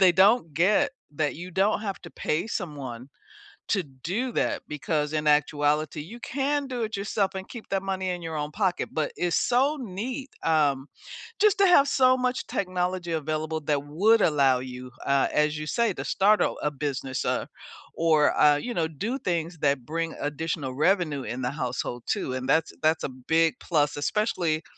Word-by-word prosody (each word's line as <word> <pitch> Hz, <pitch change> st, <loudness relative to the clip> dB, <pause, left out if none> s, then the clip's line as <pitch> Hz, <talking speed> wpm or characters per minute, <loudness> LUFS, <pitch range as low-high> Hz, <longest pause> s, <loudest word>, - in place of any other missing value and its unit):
they 185 Hz, -2 st, +7 dB
don't 190 Hz, -, +4 dB
get 210 Hz, -, +3 dB, 0.2 s
that 150 Hz, 0 st, 0 dB
you 175 Hz, +3 st, -8 dB
don't 195 Hz, +4 st, +2 dB
have 200 Hz, -3 st, -4 dB
to 170 Hz, -, -10 dB
pay 165 Hz, +7 st, -1 dB
someone 140 Hz, -, -5 dB, 0.6 s
to 195 Hz, -4 st, +1 dB
do 180 Hz, -, -4 dB
that, -, -, -1 dB
because 150 Hz, +1 st, -2 dB
in 150 Hz, -1 st, 0 dB
actuality, 150 Hz, +1 st, +2 dB
you 210 Hz, +11 st, -10 dB
can 285 Hz, +1 st, -1 dB
do 250 Hz, -3 st, -4 dB
it 220 Hz, -2 st, -2 dB
yourself 200 Hz, -1 st, -1 dB
and 190 Hz, 0 st, -5 dB
keep 235 Hz, -3 st, -10 dB
that 195 Hz, -1 st, -1 dB
money 190 Hz, -1 st, -2 dB
in 180 Hz, -, -2 dB
your 160 Hz, -1 st, -4 dB
own 150 Hz, 0 st, -2 dB
pocket. 190 Hz, +1 st, -1 dB
But 155 Hz, -2 st, -1 dB
it's 175 Hz, -1 st, 0 dB
so 270 Hz, +5 st, +2 dB
neat, 250 Hz, +5 st, -5 dB
um, 145 Hz, -4 st, +2 dB, 0.5 s
just 415 Hz, -1 st, +3 dB
to 395 Hz, -, +6 dB
have 285 Hz, -5 st, +6 dB
so 255 Hz, -1 st, +4 dB
much 250 Hz, 0 st, -1 dB
technology 180 Hz, -2 st, -2 dB
available 155 Hz, 0 st, -2 dB
that 145 Hz, -1 st, -1 dB
would 205 Hz, +9 st, +3 dB
allow 140 Hz, -4 st, +4 dB
you, 125 Hz, 0 st, -7 dB, 0.2 s
uh, 140 Hz, 0 st, +3 dB
as 150 Hz, 0 st, +2 dB
you 150 Hz, 0 st, -5 dB
say, 235 Hz, -1 st, +1 dB
to -, -, -5 dB
start 210 Hz, +2 st, +3 dB
a -, -, +2 dB
a 150 Hz, -, +1 dB
business, 135 Hz, -2 st, -3 dB
uh, -, -, 0 dB, 0.5 s
or, 160 Hz, -2 st, +3 dB
uh, 150 Hz, -1 st, +6 dB
you 240 Hz, +11 st, -3 dB
know, 165 Hz, -5 st, 0 dB
do 210 Hz, -, -3 dB
things 170 Hz, -, -2 dB
that 140 Hz, -4 st, +1 dB
bring 165 Hz, +1 st, -3 dB
additional 145 Hz, -2 st, -3 dB
revenue 155 Hz, -2 st, +1 dB
in 125 Hz, +1 st, -5 dB
the 125 Hz, -, 0 dB
household 125 Hz, -3 st, -3 dB
too, 130 Hz, -, -1 dB
and 130 Hz, 0 st, -4 dB
that's 160 Hz, 0 st, +2 dB
that's 160 Hz, +1 st, +2 dB
a -, -, -1 dB
big 160 Hz, +6 st, +1 dB
plus, 150 Hz, -4 st, +1 dB
especially 165 Hz, -1 st, 0 dB
165 Hz, 185 wpm, -26 LUFS, 150-200 Hz, 0.6 s, they